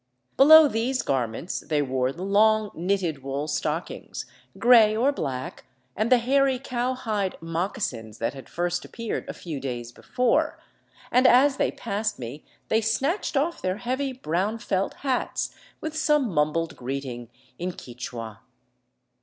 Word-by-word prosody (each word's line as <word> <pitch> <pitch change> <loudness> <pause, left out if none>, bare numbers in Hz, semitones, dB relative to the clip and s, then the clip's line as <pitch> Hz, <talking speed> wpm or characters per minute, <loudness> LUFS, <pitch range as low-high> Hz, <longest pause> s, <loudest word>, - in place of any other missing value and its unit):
Below 310 +3 +9
these 250 +1 -1
garments 125 +5 -2
they 150 -2 0
wore 130 -1 0
the 170 +6 -7
long, 215 +2 +3
knitted 175 -4 -1
wool 140 +2 -3
stockings, 155 +2 -3 0.3
gray 225 -3 +6
or 260 +5 +3
black, 130 - -5 0.3
and 220 +4 0
the 255 - +8
hairy 265 +2 +2
cowhide 245 -6 -2
moc 165 +6 -2
casins 115 - -4
that 115 - -2
had 135 -2 -11
first 175 0 -1
appeared 230 -1 -5
a - - -3
few 160 -5 -6
days 120 -3 -5
before, 250 - 0 0.5
and 255 +1 +5
as 270 +3 +5
they - - +2
passed 210 +1 -3
me 125 +5 -7 0.2
they 220 - +2
snatched 270 - 0
off 320 +5 0
their 185 +1 -1
heavy, 260 +4 -2
brown 205 -2 -1
felt 195 -4 -1
hats 260 -2 -1 0.3
with 315 0 -4
some 300 -6 +2
mum 150 0 +3
bled 165 +1 -2
greeting 125 -2 -5 0.3
in 180 +2 -2
Quichua. 120 -5 -8
195 Hz, 145 wpm, -25 LUFS, -, 0.5 s, Below